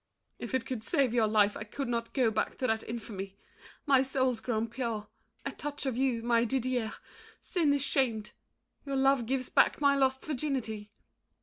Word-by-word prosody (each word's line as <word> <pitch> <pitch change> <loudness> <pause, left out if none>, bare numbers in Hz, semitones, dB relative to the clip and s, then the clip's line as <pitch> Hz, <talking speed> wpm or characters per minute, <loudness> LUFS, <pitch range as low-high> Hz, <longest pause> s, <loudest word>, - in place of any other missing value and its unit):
If - - -3
it 250 -3 -1
would 245 -4 -2
save 270 -1 +1
your 230 -3 +3
life, 210 -1 +3
I - - -5
could 270 +6 -5
not 235 -1 -2
go 250 -5 +3
Back - - -1
to 260 - -1
that 220 -2 +1
infamy. 200 -4 -6 0.5
My 275 -3 +5
soul's 260 -3 +1
grown 225 -2 -1
pure 230 -3 -4 0.4
At - - -5
touch 290 -1 -4
of 265 -3 -1
you, 250 -3 0
my 235 -1 +3
Didier; 250 -2 -1 0.5
sin 330 -6 +1
is 285 -1 +2
shamed. 230 -8 0 0.5
Your 275 -1 -3
love 270 -3 +3
gives 260 0 -1
back - - +4
my 280 -1 +4
lost 265 -1 +1
virginity. 255 -8 -2
250 Hz, 180 wpm, -30 LUFS, 225-270 Hz, 0.5 s, My